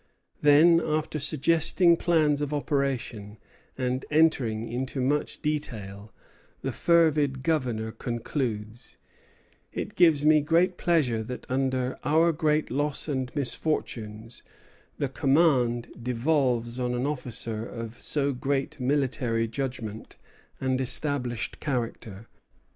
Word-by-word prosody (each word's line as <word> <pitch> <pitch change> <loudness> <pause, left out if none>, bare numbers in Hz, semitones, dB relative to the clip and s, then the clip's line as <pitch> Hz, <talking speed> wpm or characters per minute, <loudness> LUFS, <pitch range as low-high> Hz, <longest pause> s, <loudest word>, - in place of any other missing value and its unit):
Then, 160 +3 +6
after 155 0 -1
suggesting 165 +4 +3
plans 155 -4 +2
of 145 0 -2
operation, 135 -8 -2 0.4
and 130 0 -1
entering 130 -8 +2
into 130 +3 -3
much 145 +5 -1
detail, 110 -9 -4 0.5
the - - -1
fervid 155 -6 +2
Governor 125 -8 -1
concludes: 115 -1 -4 0.7
"It - - -5
gives 155 -4 +4
me 155 0 +6
great 170 +4 +2
pleasure 150 -11 +1
that 125 +2 -7
under 130 -1 -1
our 160 +4 +4
great 155 -1 0
loss 145 +3 -1
and 130 -4 -2
misfortunes 115 -6 -3 0.6
the 140 - 0
command 135 -4 +2
devolves 125 -1 0
on 125 -1 -1
an 125 +2 -1
officer 120 -6 -3
of 115 0 -7
so 140 -1 +1
great 135 +2 -2
military 125 -4 0
judgment 115 -3 -5 0.4
and 130 0 0
established 125 -3 -2
character. 115 -6 -4
135 Hz, 110 wpm, -27 LUFS, 120-150 Hz, 0.7 s, Then